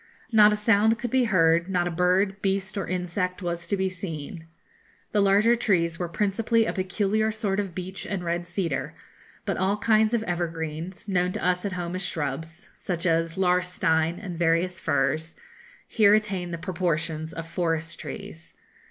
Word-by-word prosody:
Not 215 -2 +7
a - - +2
sound 215 +1 +3
could 235 0 -4
be 260 -1 +3
heard; 170 -3 +3
not 175 -2 +1
a - - -2
bird, 185 +3 +1
beast, 195 0 -1
or 195 - -3
insect 180 +1 -2
was 170 -1 -3
to 200 - 0
be 190 0 +1
seen. 165 -3 -6 0.6
The 210 - +2
larger 205 +4 +4
trees 170 -7 +1
were 175 -2 -2
principally 220 +4 +1
a - - -1
peculiar 205 +3 0
sort 210 -2 -1
of 195 -4 -3
beech 185 +1 -6
and 195 -3 -3
red 175 0 -2
cedar, 170 -3 -2 0.5
but - - -1
all 195 +2 +1
kinds 220 +1 +3
of 225 - 0
evergreens, 170 +1 -4
known 180 -2 +1
to - - -3
us 180 +1 +1
at 200 - -2
home 175 -1 -3
as 185 - -3
shrubs, 160 0 -4
such 175 -1 -4
as 165 0 +1
laurestine, 180 -3 +1
and 180 -5 -6
various 175 +2 +1
firs, 155 +4 0 0.5
here 210 -2 +5
attain 195 -5 -1
the 170 - -4
proportions 165 -3 -2
of 165 0 -6
forest 165 -1 -2
trees. 165 +1 -9
180 Hz, 170 wpm, -26 LUFS, 170-200 Hz, 0.6 s, Not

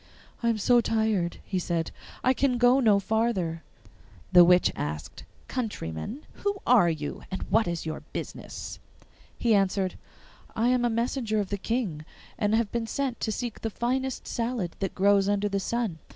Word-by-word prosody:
'I 235 - +2
am 230 - +1
so 240 +3 +4
tired,' 220 -6 0
he 190 - -1
said, 170 -2 -1 0.3
'I 255 - +4
can 260 -1 +1
go 245 +2 +5
no 215 -6 +5
farther.' 195 -6 0 0.7
The 180 -1 +9
witch 180 +1 +5
asked, 75 +1 -5 0.2
'Countryman, 220 - -4 0.2
who 405 0 0
are 230 -8 +6
you, 155 -3 -4
and 190 - -4
what 220 -1 +4
is 170 -1 -3
your 155 -1 -3
business?' - - -6 0.6
He 235 -2 +2
answered, 195 -1 +1 0.6
'I 230 +2 +2
am 250 -1 +2
a - - +3
messenger 230 -1 0
of 200 -2 -2
the 200 - -2
King, 195 -9 -2 0.4
and 210 +1 +2
have 225 -2 +1
been 235 -1 -2
sent 265 +1 -2
to 220 - -1
seek 235 0 -4
the 225 - -1
finest 260 +4 -2
salad 230 -7 -2
that 195 - -3
grows 200 0 +4
under 205 0 +1
the 200 -1 -1
sun. 215 -4 -2
215 Hz, 170 wpm, -27 LUFS, 185-240 Hz, 0.7 s, The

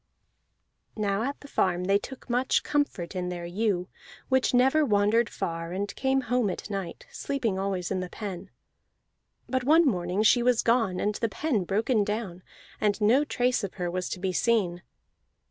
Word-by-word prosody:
Now 200 -1 0
at 275 +4 -3
the 285 - -11
farm 180 -9 0
they 195 +2 +3
took 265 +5 -10
much 250 +1 +1
comfort 285 -12 -1
in 180 -1 -2
their 175 -1 -5
ewe, 185 0 -1 0.4
which 260 -1 +3
never 265 +5 +4
wandered 210 -1 +3
far, 165 0 -4
and 200 +2 -3
came 265 0 +1
home 245 -3 +1
at 200 - -6
night, 195 -4 -5
sleeping 235 -9 -2
always 190 -2 -2
in 190 - 0
the 180 -1 -4
pen. 195 -2 -6 1.0
But 260 -1 -1
one 320 +5 +5
morning 185 -4 0
she 240 +2 +5
was 245 -1 +2
gone 225 -6 +2
and 210 - 0
the 230 +2 -1
pen 225 - -1
broken 215 +4 +1
down, 205 -4 -4 0.4
and 210 -1 +1
no 230 +7 +4
trace 250 -5 0
of 195 - -5
her 180 -2 -3
was 180 0 -3
to - - -4
be 185 0 -1
seen. 185 -5 +1
210 Hz, 175 wpm, -27 LUFS, 185-245 Hz, 1.0 s, one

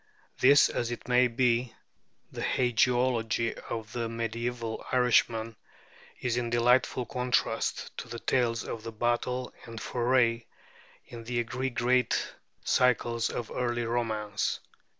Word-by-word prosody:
This 140 +2 +7
as 120 - -2
it 120 -1 -6
may 125 0 +4
be, 120 0 +1 0.6
the - - -6
hagiology 120 -1 +1
of 110 -2 -5
the 115 -2 -2
mediæval 115 0 -3
Irishman 115 -3 +2 0.6
is 125 -1 -1
in 120 -1 -1
delightful 120 +1 +2
contrast 125 +1 -1
to - - -7
the 120 0 -6
tales 115 -1 0
of 115 -1 -7
battle 125 +2 -1
and 115 -1 -8
foray 120 0 +1 0.6
in 115 -1 -10
the 120 0 -1
three 125 +3 -3
great 125 0 +1 0.3
cycles 120 -2 +2
of 120 - -5
early 120 -1 -1
romance. 110 -3 -1
120 Hz, 120 wpm, -29 LUFS, 115-125 Hz, 0.6 s, This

